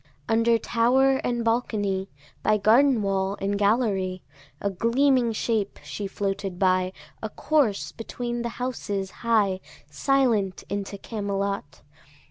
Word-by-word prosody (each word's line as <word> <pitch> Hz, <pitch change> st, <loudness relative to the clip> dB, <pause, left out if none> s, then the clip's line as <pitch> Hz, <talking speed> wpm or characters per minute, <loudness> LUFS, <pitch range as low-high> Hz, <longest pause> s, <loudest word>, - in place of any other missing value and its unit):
Under 230 Hz, +1 st, +3 dB
tower 260 Hz, +4 st, +3 dB
and 240 Hz, -3 st, -2 dB
balcony, 205 Hz, -5 st, 0 dB, 0.3 s
By 215 Hz, 0 st, +3 dB
garden 230 Hz, +3 st, +4 dB
wall 195 Hz, 0 st, 0 dB
and 200 Hz, +1 st, -1 dB
gallery, 200 Hz, -3 st, +1 dB, 0.4 s
A 200 Hz, -, -1 dB
gleaming 240 Hz, +4 st, +2 dB
shape 215 Hz, -2 st, -1 dB
she 205 Hz, -, -5 dB
floated 195 Hz, -2 st, -3 dB
by, 185 Hz, -1 st, +2 dB, 0.3 s
A 220 Hz, -, -3 dB
corse 270 Hz, -7 st, +1 dB
between 240 Hz, +1 st, -4 dB
the 235 Hz, -, -2 dB
houses 205 Hz, -6 st, -3 dB
high, 210 Hz, -5 st, +2 dB, 0.3 s
Silent 225 Hz, -, +1 dB
into 200 Hz, 0 st, -3 dB
Camelot. 200 Hz, -6 st, -3 dB
210 Hz, 115 wpm, -25 LUFS, 195-235 Hz, 0.4 s, garden